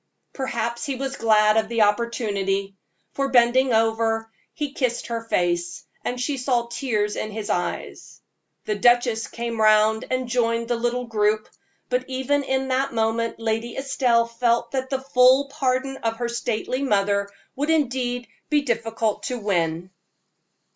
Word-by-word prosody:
Perhaps 235 -3 -3
he 275 - -2
was 270 +1 -4
glad 215 -2 +4
of 220 0 +1
the 230 -2 +3
opportunity; 205 -3 0 0.4
for, 275 0 -1
bending 255 +1 +4
over, 225 0 +1 0.2
he 290 -2 -4
kissed 245 -3 -1
her 230 -1 -4
face, 175 -5 -1 0.2
and 250 - -3
she 275 +3 -1
saw 250 -2 0
tears 225 -3 -1
in 215 - -3
his 215 0 -4
eyes. 175 - -4 0.5
The 215 - 0
duchess 240 +1 +3
came 235 -1 -4
round 215 +1 +4
and 255 -1 -1
joined 230 -1 0
the 240 - +2
little 240 +1 -1
group, 215 -1 +1 0.4
but 255 0 -1
even 265 +2 0
in 265 -1 -1
that 265 +1 +1
moment 225 +1 0
Lady 225 +1 -2
Estelle 255 -3 +2
felt 235 0 0
that 260 -1 -2
the 270 -1 -2
full 265 +1 +4
pardon 270 -1 -1
of 225 -2 -2
her 240 0 -2
stately 235 +2 -2
mother 200 -5 +1 0.3
would 290 +3 -2
indeed 250 -5 0 0.2
be 295 -1 +3
difficult 225 -3 -1
to 250 - -2
win. 175 -4 -1
235 Hz, 150 wpm, -23 LUFS, 220-255 Hz, 0.5 s, glad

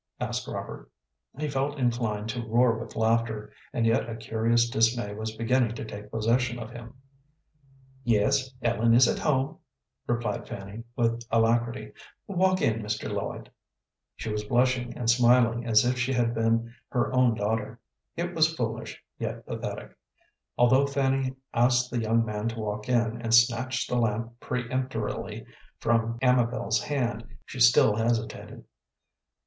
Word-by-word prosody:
asked - - -3
Robert. - - -7 0.5
He 150 +1 -2
felt 140 +1 -1
inclined 115 -4 -1
to 120 +2 -3
roar 115 +1 +3
with 110 - -8
laughter, 110 -1 0 0.2
and 115 -2 0
yet 115 0 +2
a 115 - -4
curious 115 +1 +1
dismay 115 -2 +1
was 110 +1 -5
beginning 115 0 +1
to 120 - -6
take 105 -1 -9
possession 120 +3 0
of 115 -1 -7
him. 120 +1 -10 1.1
"Yes, 130 +4 +2
Ellen 115 0 +3
is 125 +1 +7
at - - 0
home," 145 +1 0 0.5
replied 120 -3 -2
Fanny, 100 +3 -7
with 115 0 +1
alacrity. 115 +2 +1 0.3
"Walk 185 -1 +1
in, 115 0 +1
Mr. 105 0 -3
Lloyd." 100 0 -5 0.6
She 110 - -5
was 105 0 -2
blushing 125 +2 +1
and 120 - -3
smiling 120 0 +4
as 110 0 +5
if 125 0 0
she 125 +2 0
had 120 -2 +1
been 115 0 0 0.2
her 125 +1 0
own 125 -3 +4
daughter. 110 +2 -2 0.4
It 175 +1 -3
was 160 -1 +3
foolish, 115 -6 -4 0.2
yet - - -4
pathetic. - - -6 0.6
Although 130 +3 +4
Fanny 135 -1 0 0.2
asked 125 +1 +3
the 120 -2 -1
young 115 +1 +2
man 105 0 -3
to 115 0 -4
walk 105 +1 -4
in, 120 -1 +1
and 115 -1 +3
snatched 120 +2 +2
the 125 - -1
lamp 115 +1 -1
peremptorily 130 +1 -3 0.3
from 115 0 +1
Amabel's 120 -3 +2
hand, 120 -6 -3
she - - -8
still - - +6
hesitated. 115 0 -2
115 Hz, 145 wpm, -27 LUFS, 110-125 Hz, 1.1 s, is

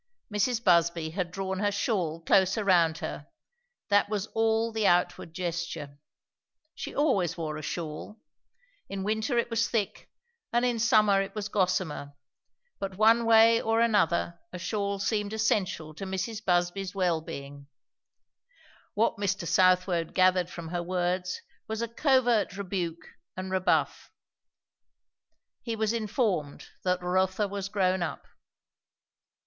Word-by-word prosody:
Mrs. 225 +3 0
Busby 170 -3 +3
had 180 0 -2
drawn 190 +1 -4
her 205 0 +1
shawl 185 -6 -1
closer 190 +5 +3
round 170 -4 +3
her; 145 - -6 0.6
that 205 0 +3
was 210 -2 -1
all 225 0 +1
the 220 -2 +1
outward 175 -1 +1
gesture. 165 -4 -4 0.7
She - - -7
always 230 - +1
wore 155 -2 -3
a 155 - -6
shawl. 165 +7 -6 0.7
In 195 -1 -4
winter 220 +4 -1
it 235 0 0
was 230 0 +1
thick 215 -4 -2 0.4
and 240 +1 +2
in 240 -2 0
summer 210 -3 +4
it 195 +1 -6
was 205 -1 -4
gossamer; 180 -7 -1 0.6
but 195 -1 -5
one 225 +2 +5
way 230 0 +6
or 225 0 +1
another 185 -7 +2
a 180 - -6
shawl 200 +2 -2
seemed 210 +1 -1
essential 185 -8 0
to 195 +5 -7
Mrs. 195 +4 -4
Busby's 180 +1 0
well 175 -4 +1
being. 140 -2 -9 1.3
What 220 0 +1
Mr. 195 -3 -1
Southwode 180 -1 +2
gathered 185 -1 +3
from 170 -2 -8
her 175 0 -2
words 180 +1 -2 0.2
was 220 +1 -3
a - - -1
covert 240 -5 +2
rebuke 180 -4 -3 0.3
and 185 0 -5
rebuff. 190 0 0 1.5
He 230 -2 -3
was 220 0 0
informed 210 - -2
that 180 -1 0
Rotha 185 +3 +1
was 200 0 -5
grown 190 -2 +1
up. 160 -5 -4
190 Hz, 135 wpm, -28 LUFS, 175-215 Hz, 1.5 s, way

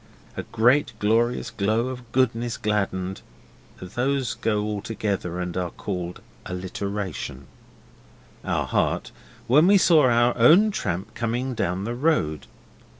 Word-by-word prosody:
A - - -3
great 120 +6 +2
glorious 115 +3 +1
glow 115 +2 0
of 125 -2 -9
goodness 120 -2 0
gladdened 95 -3 -2 0.6
(those 125 +6 -1
go 105 -2 -1
all 105 -1 -3
together 100 -5 -3
and 90 -1 -4
are 90 -1 -1
called 90 +1 -5 0.3
alliteration) 90 -6 -5 1.0
our - - -1
hearts - - 0 0.3
when 145 +8 +5
we 200 +1 +7
saw 155 -8 +5
our 120 +1 +3
own 170 - +6
tramp 95 - -3
coming 120 +3 -2
down 95 -4 -2
the 115 +3 -3
road. 120 - 0
110 Hz, 125 wpm, -24 LUFS, 95-125 Hz, 1.0 s, we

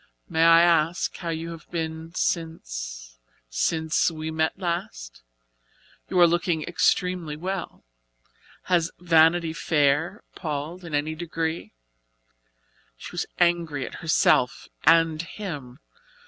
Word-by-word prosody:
"May 160 0 +1
I 165 0 +7
ask 170 0 +2
how 170 - -5
you 165 +1 -4
have 165 -2 -11
been 160 -1 -4
since - - -3 0.3
since 160 - +1
we 160 -1 -5
met 160 +1 0
last? 115 - -4 0.9
You 185 - +1
are 175 - +9
looking 170 -1 +1
extremely 175 -2 0
well. 185 +2 -5 0.8
Has 170 -3 +2
Vanity 165 -1 +4
Fair 160 +3 +1
palled 155 +2 -5
in 165 -3 -4
any 150 +2 -1
degree?" 165 - -4 1.2
She - - -9
was - - -3
angry 170 -6 +1
at - - -8
herself 140 -4 +2 0.2
and 165 -1 +5
him. 150 -9 -7
160 Hz, 115 wpm, -25 LUFS, 150-170 Hz, 1.2 s, are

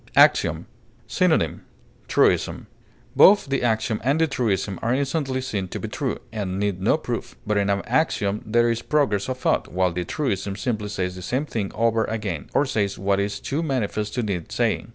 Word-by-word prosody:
AXIOM. - - +4 0.4
Synonym: - - +1 0.5
truism. - - +2 0.5
Both 205 +1 +7
the 135 - 0
axiom 110 -1 0
and 140 +5 +2
the 165 - +5
truism 105 - -1
are 115 +2 +1
instantly 140 -1 -1
seen 105 -7 -3
to - - -6
be - - -4
true, - - -2 0.2
and 95 -4 -3
need 100 -2 -1
no 110 +10 +3
proof; 125 -7 -5
but 105 -1 0
in 100 -1 +1
an 100 0 0
axiom 110 -7 0
there 120 +2 +2
is 115 0 -2
progress 130 -9 +1
of 130 - -2
thought, - - +1
while 90 -1 +1
the 90 +1 -2
truism 100 - -2
simply 110 -2 -2
says 90 -3 -2
the 90 - -8
same 130 +10 -1
thing 105 -8 -3
over 115 0 +2
again, 105 -8 -4
or 145 - +4
says 100 -7 -1
what 100 0 +1
is 100 0 -2
too 145 +4 -2
manifest 110 -8 -2
to 125 - 0
need 95 -6 -3
saying. - - 0
110 Hz, 190 wpm, -23 LUFS, 100-130 Hz, 0.5 s, Both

